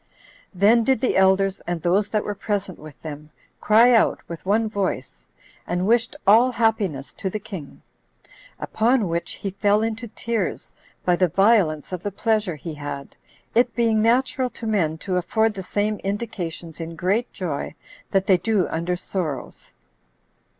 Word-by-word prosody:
Then 215 Hz, +5 st, +4 dB
did 260 Hz, 0 st, +2 dB
the 250 Hz, -, 0 dB
elders, 190 Hz, 0 st, +3 dB
and 175 Hz, -1 st, -1 dB
those 195 Hz, +4 st, +2 dB
that 215 Hz, -1 st, 0 dB
were 205 Hz, -, -3 dB
present 200 Hz, -3 st, -3 dB
with 150 Hz, -2 st, -12 dB
them, 150 Hz, -1 st, -8 dB, 0.3 s
cry 230 Hz, +3 st, +5 dB
out 225 Hz, -, +3 dB
with 170 Hz, -1 st, -8 dB
one 220 Hz, +3 st, +2 dB
voice, 180 Hz, -, -3 dB, 0.4 s
and 180 Hz, +1 st, -1 dB
wished 230 Hz, +2 st, +2 dB
all 230 Hz, +6 st, +6 dB
happiness 205 Hz, -, 0 dB
to 190 Hz, -, -4 dB
the 215 Hz, -, -3 dB
king. 190 Hz, -8 st, -9 dB, 0.8 s
Upon 230 Hz, -1 st, +1 dB
which 170 Hz, +1 st, -2 dB
he 195 Hz, -, -5 dB
fell 205 Hz, +2 st, +2 dB
into 225 Hz, +1 st, -3 dB
tears 225 Hz, -2 st, -3 dB, 0.3 s
by 180 Hz, -1 st, +3 dB
the 185 Hz, -, +3 dB
violence 190 Hz, -5 st, +2 dB
of 180 Hz, -2 st, -4 dB
the 205 Hz, -, -3 dB
pleasure 215 Hz, -3 st, 0 dB
he 155 Hz, +2 st, -7 dB
had, 145 Hz, -2 st, -7 dB, 0.4 s
it 240 Hz, 0 st, +2 dB
being 225 Hz, -2 st, +2 dB
natural 255 Hz, +3 st, +2 dB
to 235 Hz, -, -9 dB
men 175 Hz, -8 st, 0 dB
to 185 Hz, -2 st, 0 dB
afford 220 Hz, +5 st, +1 dB
the 195 Hz, -, -6 dB
same 205 Hz, +3 st, -1 dB
indications 175 Hz, -6 st, -5 dB
in 165 Hz, 0 st, -6 dB
great 195 Hz, +8 st, 0 dB
joy 165 Hz, -5 st, -4 dB, 0.3 s
that 195 Hz, -1 st, +1 dB
they 190 Hz, -, +5 dB
do 205 Hz, -1 st, +1 dB
under 170 Hz, +2 st, -1 dB
sorrows. 160 Hz, -8 st, -5 dB
195 Hz, 160 wpm, -23 LUFS, 175-220 Hz, 0.8 s, all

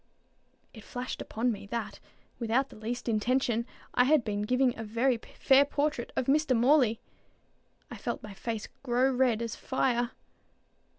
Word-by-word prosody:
It 220 Hz, -, -12 dB
flashed 250 Hz, +2 st, -5 dB
upon 240 Hz, +3 st, -1 dB
me, 200 Hz, -2 st, -7 dB
that, 210 Hz, -2 st, -4 dB, 0.4 s
without 240 Hz, +4 st, +1 dB
the -, -, -13 dB
least 230 Hz, +4 st, -5 dB
intention, 235 Hz, +1 st, +1 dB, 0.3 s
I 250 Hz, -, +4 dB
had 295 Hz, -1 st, +4 dB
been 205 Hz, -2 st, -2 dB
giving 250 Hz, +3 st, +2 dB
a 225 Hz, -, -6 dB
very 230 Hz, +4 st, +1 dB, 0.2 s
fair 270 Hz, 0 st, +6 dB
portrait 285 Hz, -3 st, -1 dB
of -, -, 0 dB
Mr. 275 Hz, -2 st, +3 dB
Morley. 245 Hz, -2 st, +4 dB, 0.9 s
I -, -, -6 dB
felt -, -, -4 dB
my 210 Hz, -2 st, -8 dB
face 225 Hz, +2 st, -4 dB
grow 255 Hz, +1 st, +2 dB
as 250 Hz, -, -4 dB
red 240 Hz, -4 st, +3 dB
as 230 Hz, -, -4 dB
fire. 245 Hz, -2 st, 0 dB
240 Hz, 160 wpm, -29 LUFS, 225-260 Hz, 0.9 s, fair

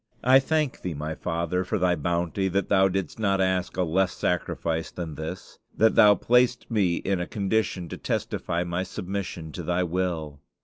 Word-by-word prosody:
I 130 Hz, +2 st, +7 dB
thank 150 Hz, -1 st, -1 dB
Thee, 90 Hz, -4 st, -4 dB
my 75 Hz, +2 st, -4 dB
Father, 85 Hz, +3 st, -2 dB
for 90 Hz, -, -1 dB
Thy 90 Hz, -1 st, +2 dB
bounty; 85 Hz, +4 st, -1 dB
that 100 Hz, +1 st, -1 dB
Thou 95 Hz, -1 st, +5 dB
didst 95 Hz, 0 st, -3 dB
not 100 Hz, -3 st, +1 dB
ask 95 Hz, -1 st, 0 dB
a 90 Hz, -, +2 dB
less 90 Hz, +2 st, +1 dB
sacrifice 80 Hz, -2 st, -1 dB
than 85 Hz, -3 st, -6 dB
this; 80 Hz, +5 st, -7 dB, 0.2 s
that 110 Hz, +1 st, +4 dB
Thou 105 Hz, -1 st, +7 dB
placedst 125 Hz, +1 st, +2 dB
me 95 Hz, -6 st, +2 dB
in 95 Hz, +1 st, -1 dB
a 90 Hz, -, -3 dB
condition 100 Hz, -3 st, -1 dB
to -, -, -6 dB
testify 85 Hz, +1 st, -2 dB
my 85 Hz, +1 st, -2 dB
submission 90 Hz, -3 st, -5 dB
to 90 Hz, -, -6 dB
Thy 90 Hz, +2 st, 0 dB
will! 85 Hz, -5 st, -2 dB
90 Hz, 180 wpm, -26 LUFS, 85-100 Hz, 0.2 s, I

